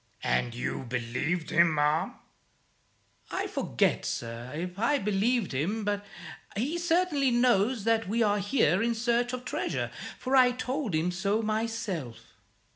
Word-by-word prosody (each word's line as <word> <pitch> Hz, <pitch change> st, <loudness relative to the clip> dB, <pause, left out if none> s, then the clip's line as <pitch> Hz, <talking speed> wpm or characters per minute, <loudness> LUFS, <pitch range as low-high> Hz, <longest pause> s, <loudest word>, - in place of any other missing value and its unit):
"And 90 Hz, -, 0 dB
you 125 Hz, +1 st, -3 dB
believed 125 Hz, +8 st, -2 dB
him, 170 Hz, -1 st, +4 dB
ma'am?" 150 Hz, +2 st, +1 dB, 1.1 s
"I -, -, -2 dB
forget, -, -, 0 dB
sir, 115 Hz, +1 st, -4 dB
if 180 Hz, +4 st, -5 dB
I 260 Hz, +6 st, +3 dB
believed 210 Hz, +1 st, +1 dB
him; 180 Hz, +12 st, -1 dB
but 205 Hz, 0 st, -1 dB, 0.5 s
he 290 Hz, +10 st, -1 dB
certainly 335 Hz, -5 st, +2 dB
knows 240 Hz, -2 st, +3 dB
that 225 Hz, -1 st, +2 dB
we 230 Hz, +2 st, +2 dB
are 205 Hz, -1 st, +2 dB
here 195 Hz, -, +2 dB
in 235 Hz, 0 st, +1 dB
search 240 Hz, +1 st, +1 dB
of 250 Hz, 0 st, -5 dB
treasure, -, -, -2 dB, 0.3 s
for 260 Hz, +1 st, 0 dB
I 250 Hz, -1 st, +6 dB
told 255 Hz, -, -2 dB
him 165 Hz, +3 st, +1 dB
so 200 Hz, +4 st, 0 dB
myself." 215 Hz, -, -2 dB
210 Hz, 140 wpm, -29 LUFS, 165-245 Hz, 1.1 s, I